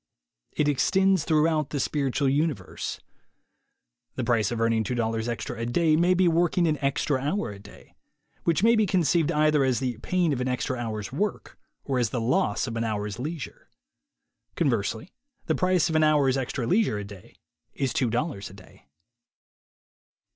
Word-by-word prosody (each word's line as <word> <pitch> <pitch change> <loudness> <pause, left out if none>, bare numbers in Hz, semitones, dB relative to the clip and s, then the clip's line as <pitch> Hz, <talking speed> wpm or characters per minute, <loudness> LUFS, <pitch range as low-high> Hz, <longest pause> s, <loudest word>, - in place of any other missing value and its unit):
It 150 - +1
extends 190 +4 +2
through 155 -1 +3
out 155 -3 0
the 145 - -3
spiritual 140 0 0
universe. 140 - -2 1.2
The - - -2
price 115 -4 +1
of 120 - -3
earning 115 -1 +2
$2 115 0 -2
extra 120 0 -4
a 115 - -2
day 155 +5 +2
may 175 +3 +3
be 180 0 +3
working 170 +1 +2
an 155 -3 0
extra 140 0 0
hour 145 - -1
a 100 - -10
day; 100 0 -16 0.5
which 170 +3 +1
may 230 +1 +5
be 215 -2 +2
conceived 170 -2 +2
either 150 -2 +3
as 130 -2 +1
the 125 -4 -3
pain 175 +1 0
of 125 - -2
an 125 - -1
extra 130 +1 -1
hour's 110 -4 -4
work 200 +10 -3 0.3
or 135 -3 -1
as 120 -3 +1
the 125 - -2
loss 115 -3 +1
of 115 -3 -5
an 115 - -1
hour's 105 0 -3
leisure. 150 +2 -6 0.9
Conversely, 115 - -1 0.3
the - - +1
price 185 -2 +2
of 160 - -2
an 155 - +4
hour's 145 -4 +3
extra 130 -2 -2
leisure 185 - +2
a 105 - -4
day 100 -2 -13 0.4
is 135 -3 -1
$2 120 -2 -1
a - - -14
day. 95 -7 -17
135 Hz, 170 wpm, -26 LUFS, 115-160 Hz, 1.2 s, may